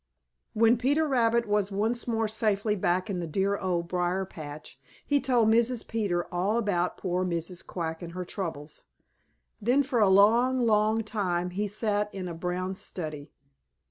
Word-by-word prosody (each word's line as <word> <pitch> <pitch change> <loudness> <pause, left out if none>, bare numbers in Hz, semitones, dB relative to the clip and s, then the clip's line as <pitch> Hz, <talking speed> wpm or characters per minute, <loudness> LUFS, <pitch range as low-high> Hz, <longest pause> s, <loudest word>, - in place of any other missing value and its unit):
When 230 +2 +4
Peter 285 +5 +2
Rabbit 235 -3 +2
was 205 -1 +1
once 220 +5 -1
more 225 -1 0
safely 215 -1 0
back 180 0 0
in 195 -4 -3
the 170 - -3
dear 195 +5 0
Old 175 -3 -2
Briar 180 +2 -1
patch, 150 -5 -10 0.3
he 285 -1 +2
told 240 -4 +3
Mrs. 235 +1 +2
Peter 200 -6 -1
all 190 +6 +1
about 185 -6 0
poor 180 -1 -1
Mrs. 170 0 -3
Quack 165 -2 -5
and 170 -1 -7
her 180 0 -4
troubles. 160 -5 -6 0.8
Then 250 +7 +3
for 260 -3 -1
a 205 -3 +5
long, 230 +7 +5
long 220 -1 +2
time 180 -5 -2
he 205 +3 -2
sat 210 0 -1
in 185 -2 -4
a 170 - -5
brown 180 +2 -3
study. 155 -6 -6
200 Hz, 165 wpm, -28 LUFS, 180-225 Hz, 0.8 s, a